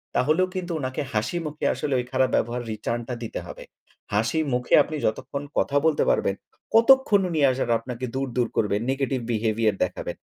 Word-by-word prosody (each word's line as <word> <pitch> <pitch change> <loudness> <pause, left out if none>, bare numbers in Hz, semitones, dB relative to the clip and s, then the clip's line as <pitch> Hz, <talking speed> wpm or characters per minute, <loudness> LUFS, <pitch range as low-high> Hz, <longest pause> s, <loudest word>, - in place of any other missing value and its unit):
তাহলেও 155 +8 +3
কিন্তু 180 -2 -3
উনাকে 130 0 -3
হাসিমুখে 150 +8 -2
আসলে 145 -3 -2
ওই 125 - -3
খারাপ 130 -1 +2
ব্যবহারের 120 0 -1
রিটার্নটা 120 +3 -3
দিতে - - -5
হবে। - - -9 0.5
হাসি 115 +10 +1
মুখে 125 0 -1
আপনি 155 - -6
যতক্ষণ 140 +5 -2
কথা 145 - +2
বলতে 160 -2 +3
পারবেন, 100 - +1 0.4
কতক্ষণ 230 -3 +6
উনি 160 - -1
আসার 130 -2 -2
আপনাকে 125 +1 -5
দূর, 135 0 -1
দূর 120 - +2
করবেন, 105 0 +1
নেগেটিভ 135 -1 -1
বিহেভিয়ার 110 -1 +1
দেখাবেন। 90 - -4
130 Hz, 165 wpm, -25 LUFS, 115-155 Hz, 0.5 s, কতক্ষণ